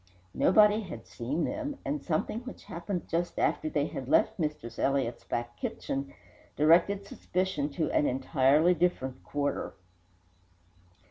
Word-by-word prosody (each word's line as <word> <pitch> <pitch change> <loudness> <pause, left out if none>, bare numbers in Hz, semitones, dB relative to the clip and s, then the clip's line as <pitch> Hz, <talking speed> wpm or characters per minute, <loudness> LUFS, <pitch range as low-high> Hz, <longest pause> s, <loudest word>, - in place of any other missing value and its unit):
Nobody 210 +2 +5
had 135 - -8
seen 135 +8 -3
them, 290 -1 -3
and 295 +1 -2
something 175 +6 -1
which 255 +2 -10
happened 175 +1 -5
just 170 +1 -2
after 155 - +1
they 145 -2 +1
had 130 -3 -6
left 220 - +3
Mistress 150 -7 -3
Elliott's 135 -3 0
back 120 0 -3
kitchen 135 0 -4 0.4
directed 175 +6 +4
suspicion 185 -6 -2
to 155 +1 -1
an 150 - +3
entirely 135 +5 +3
different 150 -7 -1
quarter. 145 0 -2
155 Hz, 130 wpm, -29 LUFS, 135-190 Hz, 0.4 s, Nobody